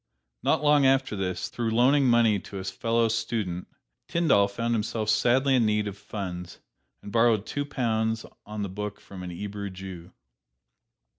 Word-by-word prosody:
Not - - +1
long 145 -1 +5
after 135 -4 +2
this, 95 -2 -2
through 120 -2 -2
loaning 130 +5 +4
money 115 -4 +4
to 100 - -9
a 95 - -5
fellow 115 +4 +1
student, 110 -5 -2 0.4
Tyndall 155 -12 +3
found 115 +4 -2
himself 110 -1 -1
sadly 130 +5 +3
in 125 -3 +4
need 105 0 +1
of 100 - -5
funds, 90 -4 -6 0.5
and 100 - -8
borrowed 115 -2 +3
two 145 0 -3
pounds 110 -4 -1 0.2
on 105 0 -5
the 100 - -3
book 105 +2 -5
from 95 -2 -11
an 90 - -6
'Ebrew 100 +3 -5
Jew. 95 -2 -9
110 Hz, 160 wpm, -27 LUFS, 100-120 Hz, 0.5 s, long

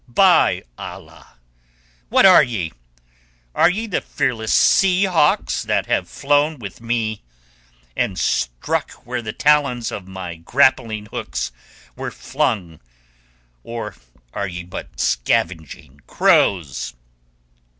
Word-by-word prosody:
By 180 +9 +4 0.2
Allah! - - -11 0.7
What - - +5
are 185 -2 +9
ye? 105 - -3 0.8
Are - - +4
ye 215 +6 -2
the 205 - -2
fearless 120 -6 -2
sea 190 0 +4
hawks 170 -6 +2
that - - 0
have - - -1
flown 145 +2 +1
with 105 -3 -9
me, 115 -2 -2 0.7
and 95 - -1
struck - - -1
where 125 +1 -3
the 110 -2 -5
talons 140 -4 +2
of 95 -2 -7
my 95 -3 -7
grappling 110 +1 +1
hooks 65 -10 -4 0.4
were - - -4
flung, 110 - -2 0.8
or 115 - -6 0.4
are 100 - -2
ye 90 -1 -6
but 65 -8 -9
scavenging 70 +2 -1
crows?" 80 -11 +2
110 Hz, 110 wpm, -20 LUFS, 90-140 Hz, 0.8 s, are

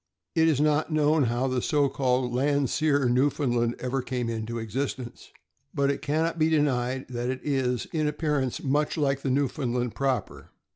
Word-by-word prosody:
It 160 -1 +3
is 155 -4 +2
not 150 +1 +2
known 155 -1 +3
how 120 +3 0
the 130 -1 0
so 145 +1 +2
called 130 -2 0
Landseer 140 +1 +1
Newfound 130 +1 +1
land 120 0 +1
ever 130 +1 -2
came 125 -2 -3
into 115 +1 -4
existence, 125 +2 -5 0.4
but 140 -1 +2
it 140 - -4
can 155 +2 0
not 165 0 -2
be 155 0 +3
denied 130 -4 +1
that 120 0 -3
it 130 0 -3
is, 130 -4 0
in 155 -2 +1
appearance, 150 -4 -1
much 145 +3 0
like 135 -2 +1
the 135 - -2
Newfoundland 125 -3 -1
proper. 135 -2 -2
135 Hz, 175 wpm, -26 LUFS, 125-145 Hz, 0.4 s, It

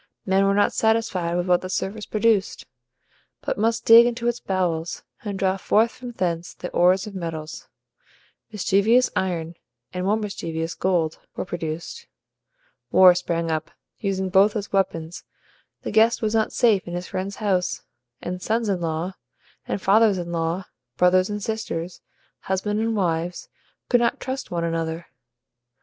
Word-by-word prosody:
Men 195 0 +3
were 200 - +2
not 205 0 +3
satisfied 220 -6 +1
with 175 0 0
what 180 -1 +3
the 185 - -6
surface 205 +3 -3
produced, 215 -2 +1 0.8
but - - -1
must 225 +2 0
dig 230 +1 +9
into 235 0 -2
its 240 0 0
bowels, 175 -3 -2 0.2
and 205 -3 -4
draw 190 0 +1
forth 220 +4 +2
from 245 -1 -9
thence 175 -4 -2
the 180 - -7
ores 185 +2 +3
of 210 - -8
metals. 165 -4 -6 0.8
Mischievous 215 +4 +3
IRON, 170 -3 -2 0.4
and 180 0 -3
more 205 +3 +2
mischievous 165 -6 -4
GOLD, 170 -4 0 0.2
were - - -3
produced. 170 - -5 0.8
War 185 -1 +8
sprang 170 -2 -2
up, 155 0 -2 0.3
using 190 -2 -1
both 195 +3 +4
as 205 -2 -4
weapons; 170 -4 -1 0.6
the - - -4
guest 225 +2 +3
was 215 0 0
not 220 -1 +1
safe 215 -7 +2
in 175 - -4
his 175 +1 -4
friend's 190 +1 -4
house; 190 -4 -1 0.4
and 180 +1 -4
sons 225 +1 0
in 185 -3 0
law 165 +3 -2 0.5
and - - -2
fathers 205 +1 +4
in 175 -1 -5
law, 165 +2 -2 0.3
brothers 185 +1 +4
and 210 -1 -4
sisters, 185 -6 -4 0.4
husbands 210 +3 -1
and 225 0 0
wives, 175 -2 -2 0.4
could 245 - +4
not 235 - +1
trust 265 +1 -5
one 170 -1 -2
another. 165 0 -2
190 Hz, 155 wpm, -23 LUFS, 175-215 Hz, 0.8 s, dig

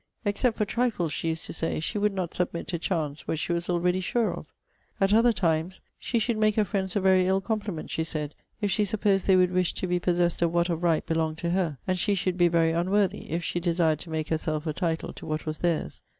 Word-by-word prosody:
'Except 220 +3 +1
for 210 - +1
trifles,' 215 -8 0
she - - -2
used 160 0 -3
to - - -6
say, 165 -1 -2
'she 160 +6 -2
would 210 +1 +2
not 180 -3 -3
submit 175 -1 -2
to 170 - -2
chance 160 -4 -2
what 160 - -1
she 170 - -1
was 170 +1 -2
already 180 +1 +1
sure 225 +4 0
of.' - - -8 0.5
At 195 +1 +3
other 230 +2 +5
times, 170 -2 0 0.2
'she 240 - -1
should 230 0 0
make 215 -1 +3
her 215 - +3
friends 190 -3 -2
a - - +3
very 185 -1 +4
ill 190 +1 +3
compliment,' 205 -5 -3
she 160 - 0
said, 150 -2 -4 0.3
'if 205 -1 +1
she 210 - +2
supposed 200 -2 +1
they 190 - +6
would 180 -1 +4
wish 180 -1 +1
to - - -2
be 180 -1 0
possessed 175 -1 +1
of 170 -1 +3
what 170 +1 +2
of 170 -1 -1
right 165 -3 +2
belonged 160 -1 -1
to 170 +1 -2
her; 175 -6 0
and 185 -1 0
she 200 +3 +2
should 185 -1 0
be 175 - +6
very 165 -1 +3
unworthy, 185 +4 0
if 170 +3 -2
she 175 - -1
desired 165 -3 +1
to 165 - -9
make 160 -1 -3
herself 155 -1 -1
a 155 - -1
title 165 -1 -2
to - - -10
what 155 0 -3
was 155 -1 -4
theirs.' 170 -3 -1
175 Hz, 250 wpm, -27 LUFS, 165-195 Hz, 0.5 s, they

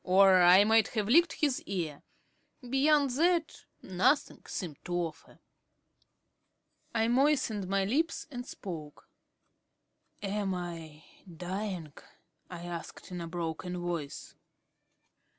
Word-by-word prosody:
or 190 0 +6
I 180 +3 +8
might 220 +1 +4
have 210 -2 +1
licked 335 +8 +5
his 285 -4 0
ear. 165 -7 -3 0.7
Beyond 280 +2 +3
that, 340 -1 +1 0.2
nothing 190 +10 +1
seemed 165 -7 -6
to 175 - -3
offer. 165 -2 -4 1.6
I 225 0 +2
moistened 245 -6 +2
my 195 0 +1
lips 320 +11 0
and 245 -2 -5
spoke. 160 -10 -8 1.2
"Am 200 -1 -1
I 165 -4 -7 0.3
dying?" 180 -3 -4 0.6
I 175 -1 -8
asked 175 +2 -8
in 180 -1 -5
a 170 - -5
broken 170 +1 -4
voice. 170 -5 -5
190 Hz, 110 wpm, -30 LUFS, 175-240 Hz, 1.6 s, I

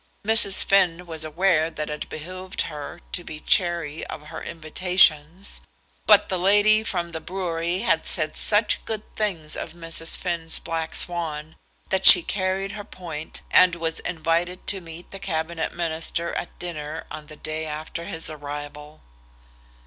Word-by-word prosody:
Mrs. 215 -3 +5
Finn 180 -3 +3
was 160 -2 -4
aware 160 0 +2
that 155 -2 -5
it 150 - -5
behoved 185 +4 -5
her 155 +3 -7
to 175 - -2
be 155 -2 -7
chary 170 -3 +2
of 150 0 -8
her 160 - -7
invitations, 165 +1 +1 0.5
but 210 -1 +7
the 185 -2 -1
lady 205 +3 +5
from 175 -5 -2
the 160 - -4
brewery 175 0 -2
had 165 - +1
said 155 -2 -2
such 210 0 +2
good 215 -1 -3
things 170 -8 -2
of - - -6
Mrs. 165 -1 0
Finn's 170 -2 -2
black 165 -1 -4
swan, 160 -3 -2 0.3
that 190 0 0
she 175 - +10
carried 195 0 -1
her 205 - -6
point, 160 -6 -8
and 185 -1 +6
was 165 -1 0
invited 170 +1 -1
to 195 -2 -2
meet 165 +1 -10
the 195 - -8
Cabinet 165 -3 -2
Minister 170 0 -2
at - - -5
dinner 160 -2 -6
on 155 -1 -8
the 155 - -11
day 155 +1 -4
after 155 +2 -5
his 160 -1 -5
arrival. 145 - -7
170 Hz, 155 wpm, -24 LUFS, 155-185 Hz, 0.5 s, she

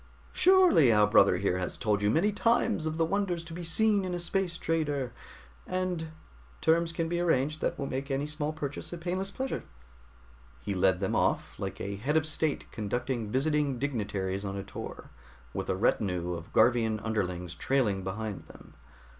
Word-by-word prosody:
"Surely 365 - +6
our 105 -1 +5
brother 100 -3 +5
here 90 -1 0
has 90 - -4
told 105 -3 0
you 105 - +2
many 175 - +3
times 210 -3 +1
of 155 0 -3
the 165 - +3
wonders 180 -2 -1
to 170 -1 -9
be 175 +1 -6
seen 205 +4 +3
in 180 -1 -2
a - - -3
space 175 0 -1
trader, 145 -6 -1 0.5
and 185 -3 -2 0.5
terms 165 +1 +2
can 165 0 -2
be 170 +1 -1
arranged 155 -3 +1
that - - -1
will 140 - -3
make 135 +1 -4
any 135 +1 0
small 150 0 -2
purchase 145 -3 -5
a 175 - -5
painless 185 +3 -2
pleasure." 260 +6 -3 1.0
He 100 - -3
led 95 0 +2
them 95 - 0
off, - - 0
like - - -4
a 100 0 -4
head 145 +9 +1
of 155 - +2
state 155 -1 -1
conducting 115 +1 -2
visiting 145 +2 +1
dignitaries 100 -7 -2
on 100 -1 -4
a 100 - -4
tour, 100 - -8 0.4
with - - -4
a - - +1
retinue 90 -3 0
of 85 -1 -8
Garvian 115 -3 +3
underlings 90 -5 -2
trailing 105 -2 0
behind 95 -3 -4
them. - - -15
140 Hz, 180 wpm, -29 LUFS, 105-170 Hz, 1.0 s, Surely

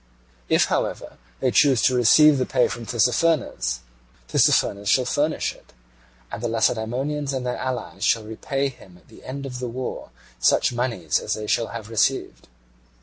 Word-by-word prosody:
If, - - +4
however, - - -3 0.2
they - - +2
choose 135 -7 +4
to 130 - +4
receive 140 +4 +6
the 130 - +1
pay 125 -2 +2
from 115 -1 -7
Tissaphernes, 120 - +1 0.5
Tissaphernes 100 0 +2
shall 130 +2 +3
furnish 150 +5 0
it: - - -22 0.6
and 105 - -6
the 120 - -1
Lacedaemonians 125 +6 -1
and 130 -1 -3
their 125 - -2
allies 120 -7 -4
shall 115 0 +2
repay 135 +6 -3
him 95 -8 -16
at - - -25
the - - -16
end 140 +1 -6
of 125 -2 -6
the 125 -1 -4
war 125 +2 -6 0.3
such 90 - +3
moneys 115 - -1
as - - -2
they 110 - -6
shall 115 +1 0
have 115 -3 -7
received. 105 - 0
125 Hz, 165 wpm, -23 LUFS, 110-135 Hz, 0.6 s, receive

